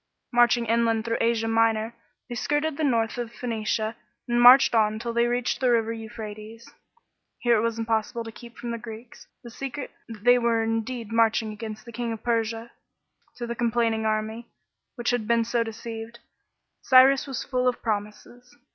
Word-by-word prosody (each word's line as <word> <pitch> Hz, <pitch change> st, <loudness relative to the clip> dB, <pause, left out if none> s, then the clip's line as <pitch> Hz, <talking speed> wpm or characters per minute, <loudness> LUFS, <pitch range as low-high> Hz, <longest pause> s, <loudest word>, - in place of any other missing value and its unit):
Marching 240 Hz, 0 st, +4 dB
inland 230 Hz, 0 st, +1 dB
through 230 Hz, 0 st, -1 dB
Asia 230 Hz, -1 st, +1 dB
Minor, 225 Hz, 0 st, +1 dB, 0.3 s
they 245 Hz, -, -6 dB
skirted 295 Hz, +5 st, -1 dB
the 315 Hz, -, -3 dB
north 235 Hz, -4 st, +1 dB
of 235 Hz, -1 st, -4 dB
Phoenicia 220 Hz, -2 st, -2 dB, 0.3 s
and 240 Hz, 0 st, +2 dB
marched 250 Hz, +2 st, +8 dB
on 215 Hz, -1 st, +2 dB
till 235 Hz, +1 st, -4 dB
they 235 Hz, +1 st, +2 dB
reached 245 Hz, 0 st, -1 dB
the 255 Hz, -2 st, +2 dB
river 230 Hz, -1 st, +2 dB
Euphrates. 220 Hz, 0 st, -9 dB, 0.7 s
Here 240 Hz, -1 st, +2 dB
it -, -, +2 dB
was 230 Hz, 0 st, -1 dB
im 225 Hz, -, -2 dB
possible 225 Hz, +1 st, -1 dB
to 225 Hz, -, -8 dB
keep 235 Hz, +1 st, -13 dB
from 240 Hz, -, -5 dB
the 235 Hz, -, -4 dB
Greeks, 225 Hz, +1 st, -11 dB, 0.2 s
the 235 Hz, -, -10 dB
secret, 270 Hz, +2 st, -6 dB, 0.2 s
that 220 Hz, -3 st, -10 dB
they 245 Hz, +1 st, +6 dB
were 230 Hz, -1 st, +1 dB
indeed 225 Hz, 0 st, -3 dB
inarching 225 Hz, -1 st, +2 dB
against 215 Hz, +1 st, -8 dB
the 235 Hz, -, -10 dB
King 235 Hz, 0 st, -3 dB
of 225 Hz, -, -9 dB
Persia. 230 Hz, 0 st, -1 dB, 0.6 s
To 240 Hz, -, -5 dB
the 235 Hz, -, -3 dB
complaining 230 Hz, -2 st, 0 dB
army, 220 Hz, +2 st, -2 dB, 0.5 s
which 240 Hz, -1 st, -1 dB
had 240 Hz, -3 st, -1 dB
been 230 Hz, 0 st, +2 dB
so 235 Hz, 0 st, 0 dB
deceived, 225 Hz, 0 st, -6 dB, 0.6 s
Cyrus 265 Hz, +2 st, +6 dB
was 270 Hz, -3 st, -4 dB
full 255 Hz, -1 st, -1 dB
of 250 Hz, -, -1 dB
promises. 225 Hz, +5 st, -5 dB
230 Hz, 180 wpm, -25 LUFS, 225-240 Hz, 0.7 s, marched